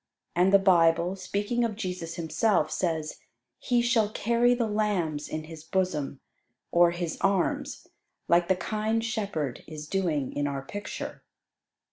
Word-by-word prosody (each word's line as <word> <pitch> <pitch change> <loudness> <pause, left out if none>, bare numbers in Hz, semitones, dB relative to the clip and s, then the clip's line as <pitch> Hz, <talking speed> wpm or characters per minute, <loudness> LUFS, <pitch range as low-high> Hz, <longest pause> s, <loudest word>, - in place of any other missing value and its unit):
And 180 +2 +4
the 200 - +8
Bible, 175 -2 +4
speaking 205 +5 -1
of 225 -3 -1
Jesus 180 -5 -4
Himself, 170 +4 +1
says, 160 -4 -2 0.4
"He 245 -2 +1
shall 235 -3 +3
carry 235 +3 +2
the 240 -1 0
lambs 200 -9 -1
in 155 0 -4
His 155 -1 -10
bosom," 160 -6 -1 0.5
or 175 0 +6
His 170 -1 -4
arms, 195 -2 0 0.4
like 170 0 +4
the 190 - +3
kind 220 +4 -1
shepherd 200 - -3
is 155 -1 -8
doing 160 -7 -1
in 145 0 -1
our 140 -1 -3
picture. 205 +8 -6
180 Hz, 140 wpm, -28 LUFS, 160-210 Hz, 0.5 s, the